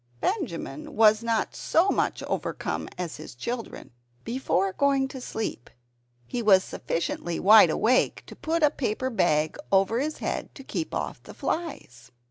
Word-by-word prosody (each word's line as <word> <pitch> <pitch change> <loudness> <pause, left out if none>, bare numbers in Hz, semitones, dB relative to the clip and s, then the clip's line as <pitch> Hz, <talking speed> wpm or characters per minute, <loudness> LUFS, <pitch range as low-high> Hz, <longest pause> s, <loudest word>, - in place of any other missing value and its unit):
Benjamin 210 - -3
was 215 0 +5
not 230 -1 -1
so 345 +5 +2
much - - 0
overcome - - -3
as 175 -3 -4
his 125 - -10
children. 235 - -6 0.3
Before 210 -6 0
going 275 +1 +2
to 265 - -8
sleep 220 - -5 0.6
he 240 - -3
was 195 -4 +5
sufficiently 170 0 -3
wide 210 -2 +8
awake 230 +10 +2
to - - -11
put 325 0 -1
a 295 - +5
paper 260 -1 -2
bag 155 -8 +1
over 195 +4 +3
his 305 +3 -2
head - - -4
to 270 - -10
keep 320 +4 -4
off - - -4
the - - -12
flies. 280 - -4
225 Hz, 150 wpm, -26 LUFS, 185-270 Hz, 0.6 s, wide